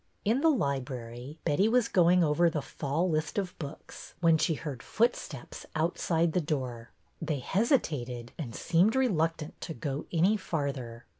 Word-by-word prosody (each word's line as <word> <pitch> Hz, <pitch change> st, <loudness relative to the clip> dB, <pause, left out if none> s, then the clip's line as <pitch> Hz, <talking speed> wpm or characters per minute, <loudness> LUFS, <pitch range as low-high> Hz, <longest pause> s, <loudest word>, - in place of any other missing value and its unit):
In 230 Hz, +6 st, +2 dB
the 325 Hz, -, +5 dB
library 130 Hz, -, -2 dB
Betty 195 Hz, +9 st, +3 dB
was 240 Hz, 0 st, +3 dB
going 180 Hz, -2 st, +4 dB
over 165 Hz, +2 st, +3 dB
the 155 Hz, -4 st, -3 dB
fall 150 Hz, +7 st, -1 dB
lists 155 Hz, -1 st, -1 dB
of 190 Hz, -3 st, -2 dB
books 145 Hz, -1 st, -9 dB
when 165 Hz, -2 st, +5 dB
she 160 Hz, -, +2 dB
heard 140 Hz, -5 st, -6 dB
footsteps 220 Hz, -, -1 dB
outside 165 Hz, 0 st, +1 dB
the 180 Hz, -, +2 dB
door. 130 Hz, -7 st, -3 dB, 0.3 s
They 155 Hz, -2 st, -1 dB
hesitated, 135 Hz, -, 0 dB
and 125 Hz, -8 st, -6 dB
seemed 185 Hz, +8 st, +3 dB
reluctant 165 Hz, -, 0 dB
to 165 Hz, -, -5 dB
go 145 Hz, -1 st, -4 dB
any 180 Hz, +6 st, +3 dB
farther. 135 Hz, -, -4 dB
160 Hz, 150 wpm, -30 LUFS, 140-180 Hz, 0.3 s, the